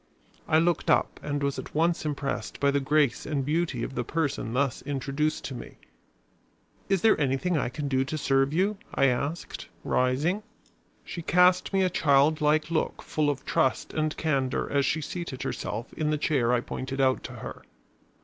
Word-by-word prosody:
I 155 Hz, -, +4 dB
looked 170 Hz, 0 st, +1 dB
up 155 Hz, -, +2 dB
and 145 Hz, -1 st, -2 dB
was 140 Hz, -1 st, -1 dB
at -, -, -9 dB
once 165 Hz, 0 st, +1 dB
impressed 140 Hz, -2 st, -3 dB
by 140 Hz, 0 st, +3 dB
the 140 Hz, -, +2 dB
grace 145 Hz, -2 st, +1 dB
and 145 Hz, -3 st, -1 dB
beauty 150 Hz, -5 st, 0 dB
of -, -, -4 dB
the 125 Hz, -, -2 dB
person 140 Hz, -4 st, -2 dB
thus 135 Hz, 0 st, 0 dB
introduced 145 Hz, +2 st, -2 dB
to 135 Hz, -, -4 dB
me. 125 Hz, -, -9 dB, 1.1 s
"Is 195 Hz, -3 st, +1 dB
there 220 Hz, -8 st, +4 dB
anything 140 Hz, +6 st, +1 dB
I 140 Hz, -, 0 dB
can 140 Hz, +3 st, -4 dB
do 130 Hz, -1 st, +2 dB
to 155 Hz, +3 st, -3 dB
serve 135 Hz, -1 st, +2 dB
you?" 195 Hz, +6 st, +1 dB, 0.2 s
I 135 Hz, -, +4 dB
asked, 140 Hz, +6 st, -2 dB, 0.2 s
rising. 140 Hz, +11 st, +1 dB, 0.6 s
She 170 Hz, -, -6 dB
cast 180 Hz, +2 st, +4 dB
me 195 Hz, -1 st, +2 dB
a 185 Hz, -, +3 dB
child 150 Hz, +2 st, +3 dB
like 155 Hz, +2 st, +2 dB
look 160 Hz, -, -1 dB
full 150 Hz, -1 st, 0 dB
of 140 Hz, -2 st, -3 dB
trust 130 Hz, -, 0 dB
and 155 Hz, 0 st, -1 dB
candor 135 Hz, -5 st, 0 dB
as 140 Hz, -1 st, +2 dB
she 155 Hz, -, 0 dB
seated 160 Hz, -4 st, -5 dB
herself 110 Hz, +4 st, -4 dB
in 155 Hz, -1 st, -1 dB
the 150 Hz, -, +1 dB
chair 135 Hz, -6 st, +1 dB
I 125 Hz, -1 st, +2 dB
pointed 135 Hz, +2 st, -5 dB
out 130 Hz, -1 st, +3 dB
to -, -, -7 dB
her. -, -, -8 dB
145 Hz, 185 wpm, -27 LUFS, 135-160 Hz, 1.1 s, I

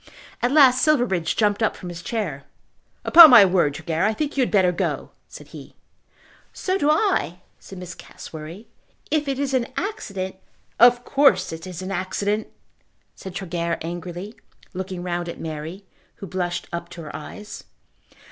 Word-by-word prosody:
At 245 Hz, -, +1 dB
last 265 Hz, -4 st, +6 dB
Silverbridge 245 Hz, -, +1 dB
jumped 210 Hz, -1 st, +1 dB
up 220 Hz, -, +1 dB
from 180 Hz, -, -8 dB
his 170 Hz, -1 st, -8 dB
chair. 175 Hz, -, -4 dB, 0.6 s
"Upon 330 Hz, -1 st, +10 dB
my 235 Hz, -6 st, +9 dB
word, 175 Hz, -6 st, +1 dB
Tregear, 160 Hz, +2 st, -2 dB
I 215 Hz, +1 st, +1 dB
think 300 Hz, +2 st, -3 dB
you 275 Hz, -, +1 dB
had 250 Hz, -, +1 dB
better 190 Hz, -4 st, +3 dB
go," 175 Hz, -, -3 dB, 0.2 s
said -, -, -13 dB
he. -, -, -12 dB, 0.8 s
"So 375 Hz, -, -2 dB
do 290 Hz, -, +2 dB
I," 305 Hz, -, +1 dB, 0.2 s
said 195 Hz, -, -12 dB
Miss 180 Hz, 0 st, -8 dB
Cassewary. 165 Hz, +7 st, -10 dB, 0.5 s
"If 300 Hz, -1 st, +1 dB
it 270 Hz, -1 st, -1 dB
is 275 Hz, -1 st, -2 dB
an 250 Hz, -2 st, +1 dB
accident 195 Hz, -, -4 dB, 0.2 s
" -, -, -40 dB
"Of 245 Hz, 0 st, -10 dB
course 280 Hz, -, +3 dB
it 160 Hz, +3 st, -8 dB
is 180 Hz, 0 st, -7 dB
an 190 Hz, -, -5 dB
accident," 200 Hz, +3 st, -2 dB, 0.7 s
said 190 Hz, -1 st, -10 dB
Tregear 170 Hz, -2 st, -3 dB
angrily, 175 Hz, +4 st, -6 dB, 0.4 s
looking 185 Hz, -1 st, -5 dB
round 175 Hz, -1 st, -3 dB
at -, -, -8 dB
Mary, 160 Hz, +5 st, -7 dB, 0.3 s
who -, -, -9 dB
blushed 180 Hz, -1 st, -3 dB
up 170 Hz, 0 st, -5 dB
to 175 Hz, -1 st, -9 dB
her 150 Hz, -, -9 dB
eyes. 205 Hz, +7 st, -9 dB
190 Hz, 165 wpm, -23 LUFS, 175-245 Hz, 0.8 s, Upon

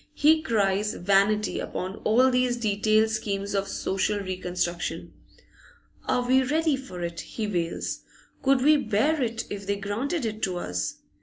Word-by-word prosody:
He 310 Hz, +2 st, +5 dB
cries 210 Hz, -6 st, +1 dB
vanity 200 Hz, +3 st, +2 dB
upon 190 Hz, +2 st, -4 dB
all 255 Hz, +4 st, +3 dB
these 250 Hz, -1 st, +1 dB
detailed 215 Hz, 0 st, +2 dB
schemes 200 Hz, -2 st, -2 dB
of 195 Hz, 0 st, 0 dB
social 195 Hz, +2 st, -1 dB
reconstruction. 180 Hz, -2 st, -3 dB, 0.9 s
Are 245 Hz, 0 st, 0 dB
we 260 Hz, +1 st, +5 dB
ready 305 Hz, +3 st, +1 dB
for 185 Hz, -10 st, -7 dB
it? 170 Hz, 0 st, -4 dB
he 220 Hz, -, -4 dB
wails. 175 Hz, -5 st, -2 dB, 0.4 s
Could 270 Hz, -1 st, +3 dB
we 305 Hz, +1 st, +6 dB
bear 280 Hz, +5 st, +1 dB
it, 230 Hz, -2 st, -2 dB
if 200 Hz, -1 st, -6 dB
they 200 Hz, -, +1 dB
granted 230 Hz, -, -2 dB
it 215 Hz, 0 st, -4 dB
to 185 Hz, -2 st, -1 dB
us? 90 Hz, -, -3 dB
215 Hz, 150 wpm, -26 LUFS, 195-255 Hz, 0.9 s, we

